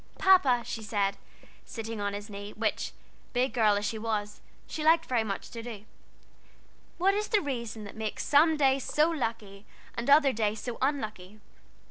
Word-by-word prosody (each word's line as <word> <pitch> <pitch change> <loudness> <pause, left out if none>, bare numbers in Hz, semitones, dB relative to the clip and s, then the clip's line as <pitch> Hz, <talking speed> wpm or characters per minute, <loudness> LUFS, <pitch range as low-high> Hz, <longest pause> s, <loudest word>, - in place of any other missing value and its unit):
"Papa," 360 -11 +5
she 225 - -5
said, 205 -2 0 0.5
sitting 225 -2 -6
on 200 0 -1
his 205 +1 -6
knee, 205 0 -8
which, 215 -1 -2 0.4
big 255 +1 +1
girl 215 -4 +4
as 205 +1 -1
she 220 +1 -2
was, 210 -2 -3 0.2
she 310 - -5
liked 325 +1 +5
very 240 -3 +1
much 200 -3 -5
to 230 - -6
do, 225 -3 -8 1.1
"what 385 +3 +3
is 420 +1 -1
the 430 - +3
reason 235 - -4
that 200 - -9
makes 220 -1 -3
some 310 +2 +5
days 270 -2 +3
so 305 +3 +2
lucky 225 -9 -4 0.3
and 235 +3 -3
other 285 -2 +6
days 215 -1 0
so 245 +1 -6
unlucky? 215 -8 -2
230 Hz, 170 wpm, -29 LUFS, 210-280 Hz, 1.1 s, other